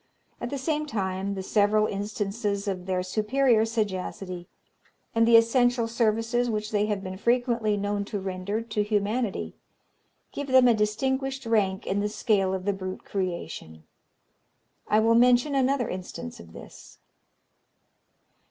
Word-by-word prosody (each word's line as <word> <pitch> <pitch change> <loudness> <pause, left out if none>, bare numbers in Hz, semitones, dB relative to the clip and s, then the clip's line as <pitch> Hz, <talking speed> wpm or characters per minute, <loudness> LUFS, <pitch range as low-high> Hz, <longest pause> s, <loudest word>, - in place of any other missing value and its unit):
At 240 - -3
the 280 - -3
same 305 +2 -1
time, 195 -4 -2
the 190 - -4
several 210 +2 +3
instances 205 0 -3
of 185 -2 -3
their 185 -1 0
superior 220 +4 +2
sagacity, 190 -5 -3 0.7
and 230 0 +3
the 230 0 +8
essential 240 +1 +3
services 230 +1 +1
which 215 -1 -2
they 210 -1 +1
have 205 -2 -2
been 185 -1 -6
frequently 235 -2 +1
known 205 0 -1
to 205 0 -4
render 190 +3 -3
to 220 -2 -2
humanity, 210 +1 -1 0.8
give 285 - -5
them 260 -1 +6
a 240 - +6
distinguished 265 +5 -1
rank 200 -4 +1
in 195 - -1
the 210 +1 0
scale 205 -3 +1
of 190 -1 -3
the 200 - +1
brute 185 -1 -6
creation. 170 - -5 1.0
I 215 - +4
will 225 +1 +4
mention 245 +4 +4
another 270 -2 +1
instance 180 - -7
of 85 -1 -13
this. - - -13
210 Hz, 145 wpm, -26 LUFS, 195-235 Hz, 1.0 s, the